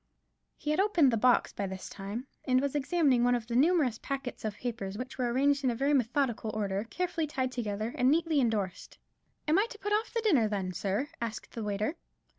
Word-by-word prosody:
He 300 - -2
had 305 - +1
opened 350 -9 +4
the - - +2
box 245 +2 +3
by 200 - -3
this 190 0 -6
time, 205 +6 -6 0.2
and 255 0 +3
was 280 0 -1
examining 290 -4 +2
one 245 0 +4
of 235 -2 -3
the 235 +1 -4
numerous 280 -4 +3
packets 275 -3 -5
of 215 -2 -2
papers, 210 -5 -4
which 255 +2 -7
were 245 -1 +1
arranged 280 +3 +2
in 255 - +3
very 280 +3 +2
methodical 245 -3 +1
order, 200 -1 -1
carefully 345 +3 -2
tied 260 -3 -2
together, 220 -2 -3
and 255 -3 +3
neatly 315 -1 +3
endorsed. 210 -6 -2 0.5
"I - - +2
am 335 - +5
to 440 - -9
put 415 0 -2
off 435 +2 0
the 465 - -1
dinner, 290 - +4
then, 195 -3 -2
sir?" 200 - -1
asked 225 -1 -5
the 230 - -5
waiter. 210 +9 -2
250 Hz, 210 wpm, -30 LUFS, 215-290 Hz, 0.5 s, am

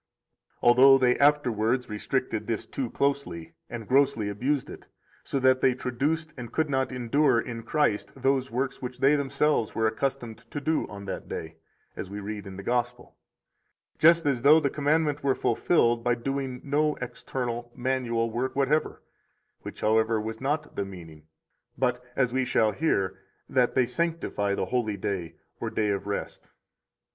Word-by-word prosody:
Although 130 +3 +7
they 125 -2 +3
afterwards 125 -4 +2
restricted 110 +1 -2
this 115 -2 -2
too 130 -3 -4
closely, 140 -14 -2 0.2
and 115 -2 -7
grossly 130 -6 +2
abused 130 +7 -1
it, - - -11 0.4
so 135 - -2
that 130 0 +4
they 130 -1 +3
traduced 150 +6 -2
and 120 -2 -7
could 155 +1 0
not 130 -1 0
endure 125 +1 +2
in 115 0 -5
Christ 130 -5 0
those 135 0 +1
works 130 +3 -2
which 125 -1 -6
they 140 +2 +4
themselves 140 -3 0
were 110 - +1
accustomed 120 0 -2
to 145 - -4
do 155 +2 0
on 100 -1 -9
that 95 - -5
day, 80 0 -6 0.4
as 95 - -6
we 100 +1 -6
read 105 0 -6
in 95 -1 -8
the 100 - -7
Gospel; 120 +2 -2 0.8
just 165 +1 +6
as 135 -4 +1
though 150 +4 +7
the 140 -3 0
commandment 150 0 +1
were 135 -2 +2
fulfilled 120 -8 +2
by 120 0 +2
doing 130 +1 -3
no 150 +2 +1
external, 120 -1 -5
[manual] 120 -3 -1
work 125 +3 -2
whatever, 140 +3 0 0.6
which, - - -9
however, 110 +1 +2
was 110 +2 -5
not 150 +3 -2
the 100 - -1
meaning, 80 -5 -11 0.5
but, 125 -1 0
as 125 -3 +1
we 130 0 +1
shall 110 -3 +2
hear, 100 -8 0 0.3
that 125 -2 +1
they 130 -2 +4
sanctify 125 -8 -1
the - - -1
holy 110 -1 -1
day 90 -4 -4 0.2
or - - -3
day 105 -1 0
of 100 0 -2
rest. 100 - -5
125 Hz, 165 wpm, -27 LUFS, 110-140 Hz, 0.8 s, Although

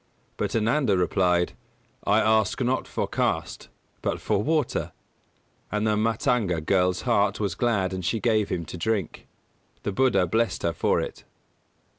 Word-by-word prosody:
But - - -2
Ananda 115 0 +2
replied: 90 0 +2 0.5
"I 105 +2 +4
ask 110 0 +2
not 130 0 0
for - - -2
caste - - -2 0.3
but - - -1
for 100 - 0
water"; 155 +2 0 0.8
and 105 +1 0
the 105 -1 +2
Mātanga 110 - 0
girl's 90 -1 +2
heart 115 -5 +2
was 100 -2 -1
glad 100 -6 0
and 95 -1 -4
she 100 +7 0
gave 110 -2 +1
him 85 -2 -2
to 90 - -8
drink. 105 -2 -2 0.6
The - - -1
Buddha 115 -4 +3
blessed 95 +1 0
her 85 - +1
for 80 - +1
it. - - -5
105 Hz, 150 wpm, -25 LUFS, 90-115 Hz, 0.8 s, I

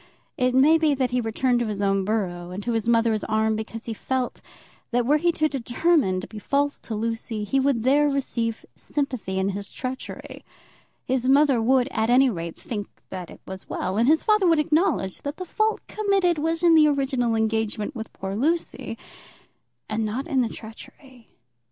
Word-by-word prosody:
It 250 0 +1
may 305 +5 +6
be 305 -3 +3
that 260 -2 0
he 250 0 +1
returned 240 +2 +1
to 240 - -1
his 210 -2 -4
own 195 -1 +1
borough 180 -5 -2
and 185 +3 -6
to 240 - -1
his 225 0 -1
mother's 230 -2 +2
arms 220 0 +1
because 220 +1 -6
he 230 - -3
felt, 255 +3 -3 0.5
that 245 -1 +1
were 295 +4 +4
he 345 +3 +2
to 310 -1 +2
determine 270 - +1
to - - -8
be 215 - -9
false 285 +5 0
to 225 - -6
Lucy, 225 0 -3
he 270 +7 +1
would 265 -4 +1
there 290 +3 +4
receive 235 -5 -2
sympathy 255 -10 -3
in 190 +1 +1
his 200 0 -5
treachery. 255 0 -7 0.6
His 255 0 0
mother 275 -3 +4
would, 250 +2 +3
at 220 +1 0
any 255 +1 +5
rate, 170 -4 -6
think 205 -4 -5 0.2
that 180 -2 -6
it - - -13
was 190 0 -8
well, 185 - -2
and 235 - +3
his 315 +2 +4
father 425 -3 +3
would 330 -1 +4
acknowledge 300 - +1
that 285 +1 -5
the 370 - -5
fault 435 +4 -1
committed 390 -6 +1
was 325 +2 -1
in 340 -1 +6
the 310 -1 +7
original 265 -5 +1
engagement 220 +2 -1
with 225 -2 -6
poor 195 0 -5
Lucy, 320 +9 -1 0.9
and 215 +1 -1
not 225 +6 -2
in 275 -6 +1
the 235 - 0
treachery. 240 +3 -12
245 Hz, 190 wpm, -24 LUFS, 220-285 Hz, 0.9 s, the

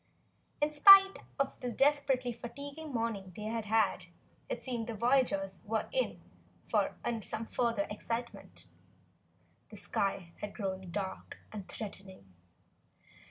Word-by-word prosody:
In 295 +1 +2
spite 390 +6 +9 0.2
of 275 -1 -1
the 250 -1 -3
desperately 270 -2 +2
fatiguing 280 +6 -8
morning 225 -6 -2
they 210 - -7
had 225 0 -3
had, 215 -4 +2 0.4
it - - -4
seemed 240 -3 -3
the 230 - -4
voyagers 215 -5 +1
were 220 0 -1
in - - -1 0.5
for - - +1 0.3
some 220 +2 -3
further 230 -3 0
excitement. 230 +3 -5 1.0
The - - -10
sky 190 -3 -2
had 205 -1 -6
grown 190 -3 -4
dark 190 +1 -5
and 205 -3 -7
threatening. 190 - -8
230 Hz, 120 wpm, -32 LUFS, 200-265 Hz, 1.0 s, spite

